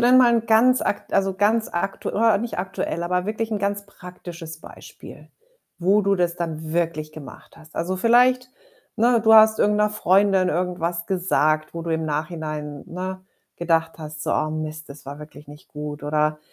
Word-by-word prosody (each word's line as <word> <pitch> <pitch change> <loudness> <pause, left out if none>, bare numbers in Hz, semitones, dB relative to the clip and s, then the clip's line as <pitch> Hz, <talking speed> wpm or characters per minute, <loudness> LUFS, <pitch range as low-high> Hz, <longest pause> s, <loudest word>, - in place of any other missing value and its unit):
denn 245 +2 +5
mal 245 -2 +6
'n 230 0 0
ganz 245 +3 +4
akt 205 - -3
also 195 -1 +1
ganz 215 +3 +2
aktu 185 +3 -3 0.3
nicht 235 -4 -4
aktuell, 180 -2 -3
aber 180 +1 -1
wirklich 220 +1 -3
'n 215 - -1
ganz 200 0 -2
praktisches 175 -4 -10
Beispiel, - - -13 0.5
wo 195 +4 +3
du 200 0 +2
das 175 -2 0
dann 160 -2 -5
wirklich 160 -2 -1
gemacht 155 -3 -12
hast? 160 0 -17
Also, 185 +3 -2
vielleicht, 250 +4 +3 0.5
ne, 235 +1 +3
du 220 0 +6
hast 220 0 +7
irgend 210 0 +3
'ner 210 0 +2
Freundin 195 -2 +3
irgendwas 175 0 -2
gesagt, 155 -5 0
wo 165 - -4
du 165 - -4
im 160 0 -1
Nachhinein, 150 -1 -4
ne, 185 +2 -5 0.4
gedacht 165 -1 +1
hast, 155 -1 -7
so: - - -1
„Oh 155 - 0
Mist, 155 0 -5
das 140 0 -12
war 140 +1 -7
wirklich 150 -1 -13
nicht 150 0 -14
gut.“ 150 0 -7
Oder 150 +1 0
175 Hz, 180 wpm, -23 LUFS, 155-205 Hz, 0.5 s, hast